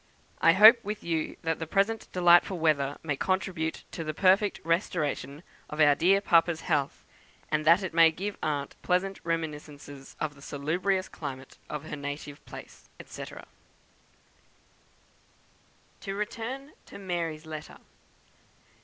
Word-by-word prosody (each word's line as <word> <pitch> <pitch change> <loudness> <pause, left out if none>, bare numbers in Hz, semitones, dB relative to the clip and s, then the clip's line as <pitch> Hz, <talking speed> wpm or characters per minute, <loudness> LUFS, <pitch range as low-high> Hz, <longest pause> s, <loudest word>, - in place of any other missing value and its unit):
I 165 - +6
hope 220 +5 +8
with 210 +1 -5
you 165 -2 -2
that 160 -1 -1
the 160 - -4
present 205 +6 0
delightful 175 +1 +4
weather 145 -4 +1
may 150 -3 -1
contribute 185 -1 -2
to 165 - -5
the 155 -1 -4
perfect 195 +3 +3
restoration 155 -4 -2 0.3
of 150 - -7
our 145 -2 +6
dear 190 +7 +3
papa's 170 -3 +3
health; 140 -2 -1 0.5
and 155 0 0
that 170 +5 +5
it 185 - -4
may 165 0 +7
give 195 +6 -5
aunt 145 -2 -2
pleasant 190 +2 0
reminiscences 150 -4 -5
of 155 -1 -2
the 140 - -18
salubrious 175 +8 -1
climate 130 -1 -8
of 150 -1 -5
her 155 - -5
native 145 0 -7
place," - - -12 0.2
&c. - - -8 2.7
To 195 -2 -5
return 235 +7 -5 0.2
to - - -11
"Mary's" 170 -5 -4
letter. 155 -1 -8
165 Hz, 135 wpm, -28 LUFS, 150-190 Hz, 2.7 s, hope